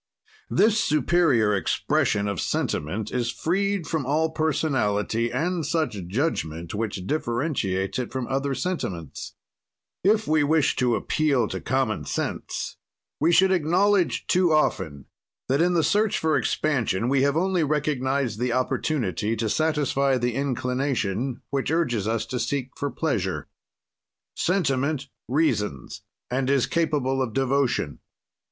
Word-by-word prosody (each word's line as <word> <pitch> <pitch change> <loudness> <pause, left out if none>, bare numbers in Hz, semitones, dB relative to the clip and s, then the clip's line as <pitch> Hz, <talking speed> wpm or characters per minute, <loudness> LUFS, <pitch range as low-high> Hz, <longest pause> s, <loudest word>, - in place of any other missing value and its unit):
"This 215 +2 +3
superior 145 -7 +3
expression 100 +1 +1
of 100 -4 -2
sentiment 95 +9 -2
is 120 -2 -1
freed 195 +4 0
from 155 0 -1
all 155 +5 +1
personality 120 -8 0
and 165 +6 -1
such 145 - -1
judgment 85 - -2
which 100 -3 -3
differentiates 120 - -1
it 125 - -4
from 130 -2 -3
other 135 +1 -1
sentiments. 95 - -4 0.7
"If 215 +3 +3
we 155 -1 +3
wished 155 0 +2
to 125 -2 +2
appeal 140 -7 +1
to - - -4
common - - -1
sense - - -3 0.4
we 160 +4 +3
should 190 +2 +5
acknowledge, 185 +3 +2
too 180 -2 +3
often, 85 - 0 0.4
that 135 +4 +2
in 175 +1 +3
the 165 - +3
search 210 +4 +2
for 160 -1 +1
expansion 120 -8 0
we 135 +1 +2
have 140 +2 +2
only 185 -1 +2
recognized 140 -5 0
the 125 -1 0
opportunity 120 - 0
to 110 -1 -1
satisfy 140 -2 +1
the 125 -1 -1
inclination 125 -3 -1
which 135 -2 -1
urges 125 - 0
us 110 0 0
to 125 - -4
seek 130 +2 -2
for 145 - -2
pleasure. 105 - -2 0.9
"Sentiment 140 -5 0 0.2
reasons, 115 - -1 0.3
and 130 +1 0
is 140 -3 +3
capable 145 -5 0
of 120 -4 -2
devotion. 130 - 0
135 Hz, 130 wpm, -25 LUFS, 115-160 Hz, 0.9 s, should